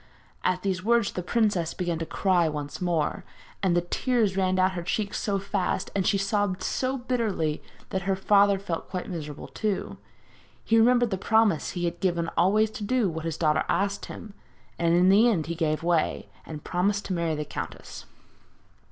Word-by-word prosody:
At 185 0 0
these 185 -2 -1
words 235 -1 +2
the 180 - -4
princess 190 -4 0
began 175 -2 -2
to 165 - -4
cry 180 -4 +2
once 150 +1 -5
more, 170 -4 0 0.4
and 185 -3 +2
the - - +3
tears 215 +2 0
ran 185 -1 +1
down 185 0 +3
her 180 -2 -4
cheeks 200 +4 -2
so 200 -2 0
fast, 195 -1 -2
and 190 -2 +1
she 200 - +3
sobbed 195 -1 0
so 260 +1 -1
bitterly, 225 - -1 0.3
that 190 - -1
her 195 - +3
father 200 +1 +4
felt 175 -4 -5
quite 185 0 -4
miserable 150 -4 -6
too. 210 -3 -3 0.6
He 225 0 +3
remembered 240 0 +4
the 190 - -1
promise 220 -6 +2
he 175 -1 -2
had 170 0 -3
given 170 -3 0
always 210 +5 +3
to 215 - -7
do 230 -1 +1
what 160 0 -5
his 165 -2 -3
daughter 155 -2 +2
asked 200 +2 0
him 215 -3 -9 0.5
and 170 0 +3
in 180 +2 +5
the 215 +5 +6
end 170 -9 0
he 170 - -3
gave 160 -2 -1
way, 170 -2 0 0.2
and 150 -2 -7
promised 200 +3 0
to 190 - -2
marry 170 -2 0
the 150 0 -3
countess. - - -7
185 Hz, 185 wpm, -26 LUFS, 170-205 Hz, 0.6 s, the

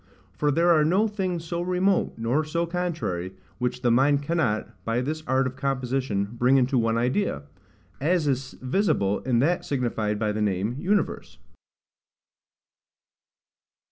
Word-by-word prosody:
For 150 - 0
there 170 +4 +3
are 155 -2 +5
no 190 +8 +3
things 185 -5 -3
so 170 +1 -3
remote, 180 +2 +1
nor 120 +7 0
so 170 +2 -1
contrary, 165 - -3 0.3
which 125 0 -2
the 120 - +3
mind 140 +4 +3
cannot, 140 -9 -1
by 115 +1 0
this 155 +5 -3
art 130 0 +2
of 130 0 -3
composition, 130 -5 -1
bring 130 +2 +4
into 130 +1 +2
one 115 0 +1
idea; 125 - 0 0.6
as 160 +2 +1
is 130 -1 -1
visible 130 - +1
in 125 -2 0
that 175 +5 +1
signified 115 -7 -1
by 105 0 0
the 105 +1 -2
name 105 +3 0
UNIVERSE. 200 +6 -1
135 Hz, 140 wpm, -25 LUFS, 120-170 Hz, 0.6 s, are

